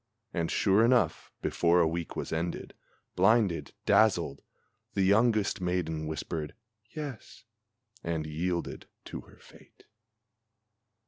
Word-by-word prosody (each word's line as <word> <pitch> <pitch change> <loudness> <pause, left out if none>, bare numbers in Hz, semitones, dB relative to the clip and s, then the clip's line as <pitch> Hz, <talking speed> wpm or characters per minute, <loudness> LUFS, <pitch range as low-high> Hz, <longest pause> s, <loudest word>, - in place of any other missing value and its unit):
And, 85 -2 -1
sure 100 +2 +3
enough, 120 0 +2
before 85 +1 +3
a 85 - +4
week 85 +1 -3
was - - -4
ended, 85 +2 -3 0.4
blinded, 95 -6 +3
dazzled, 70 - +3 0.5
The 100 - +2
youngest 105 0 +3
maiden 85 -3 -1
whispered 80 0 -4 0.3
"yes," 145 -7 -8 0.6
and 80 -2 -2
yielded 85 +3 -3 0.2
to - - -6
her - - -19
fate. - - -19
90 Hz, 110 wpm, -30 LUFS, 80-105 Hz, 0.6 s, a